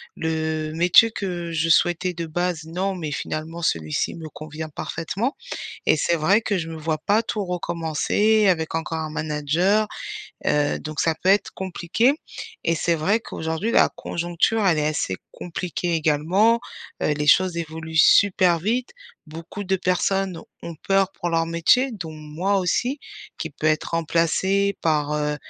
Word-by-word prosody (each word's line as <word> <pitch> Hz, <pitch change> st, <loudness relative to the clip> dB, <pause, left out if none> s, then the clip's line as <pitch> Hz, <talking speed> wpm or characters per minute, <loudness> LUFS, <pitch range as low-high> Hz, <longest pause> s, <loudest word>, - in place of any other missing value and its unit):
le 160 Hz, -1 st, -2 dB
métier 180 Hz, +7 st, +5 dB
que 175 Hz, -5 st, -4 dB
je 165 Hz, +1 st, 0 dB
souhaitais 175 Hz, +2 st, +3 dB
de 170 Hz, -1 st, -4 dB
base, 170 Hz, 0 st, -2 dB
non, 185 Hz, +4 st, -2 dB
mais 160 Hz, -4 st, -4 dB
finalement 160 Hz, +3 st, -4 dB
celui-ci 80 Hz, -, -1 dB
me 160 Hz, -1 st, -8 dB
convient 155 Hz, +1 st, -7 dB
parfaitement, 185 Hz, -, -3 dB, 0.5 s
et -, -, +5 dB
c'est 170 Hz, -, +1 dB
vrai 190 Hz, +8 st, +3 dB
que 205 Hz, -3 st, 0 dB
je 165 Hz, -1 st, -4 dB
me 165 Hz, -, -6 dB
vois 155 Hz, 0 st, -2 dB
pas 205 Hz, +8 st, +2 dB
tout 215 Hz, -2 st, -3 dB
recommencer 180 Hz, +5 st, +1 dB
avec 160 Hz, -3 st, +1 dB
encore 165 Hz, 0 st, -2 dB
un 155 Hz, -1 st, -4 dB
manager, 155 Hz, +8 st, +1 dB, 0.6 s
heu, 145 Hz, 0 st, +2 dB
donc 155 Hz, -1 st, -5 dB
ça 165 Hz, -, +2 dB
peut 185 Hz, -, +1 dB
être 200 Hz, +1 st, +2 dB
compliqué, 190 Hz, +7 st, +1 dB, 0.5 s
et 165 Hz, -, +2 dB
c'est 170 Hz, +1 st, +1 dB
vrai 190 Hz, +8 st, +2 dB
qu'aujourd'hui 160 Hz, +3 st, -3 dB
la -, -, +5 dB
conjoncture 175 Hz, +6 st, 0 dB
elle 170 Hz, -4 st, +3 dB
est 150 Hz, -, +1 dB
assez 150 Hz, -11 st, -1 dB, 0.2 s
compliquée, 175 Hz, 0 st, -3 dB
également, 165 Hz, +9 st, +3 dB, 0.4 s
heu, 150 Hz, -, +2 dB
les 150 Hz, 0 st, -2 dB
choses 180 Hz, +3 st, +4 dB
évoluent 160 Hz, -1 st, -5 dB
super 180 Hz, +1 st, +5 dB
vite, 235 Hz, +7 st, -1 dB, 0.4 s
beaucoup 165 Hz, +6 st, -8 dB
de 190 Hz, 0 st, +1 dB
personnes 185 Hz, 0 st, 0 dB, 0.2 s
ont 170 Hz, -1 st, -7 dB
peur 195 Hz, -1 st, +3 dB
pour 175 Hz, -, -4 dB
leur 165 Hz, 0 st, +1 dB
métier, 170 Hz, +11 st, +3 dB
dont 165 Hz, -7 st, -6 dB
moi 155 Hz, +6 st, -1 dB
aussi, 245 Hz, +9 st, 0 dB, 0.4 s
qui 160 Hz, -, -4 dB
peut 150 Hz, +2 st, -4 dB
être 155 Hz, 0 st, +1 dB
remplacé 170 Hz, +4 st, +1 dB
par, 150 Hz, -2 st, +1 dB
heu, 150 Hz, 0 st, -1 dB
170 Hz, 160 wpm, -23 LUFS, 155-190 Hz, 0.6 s, métier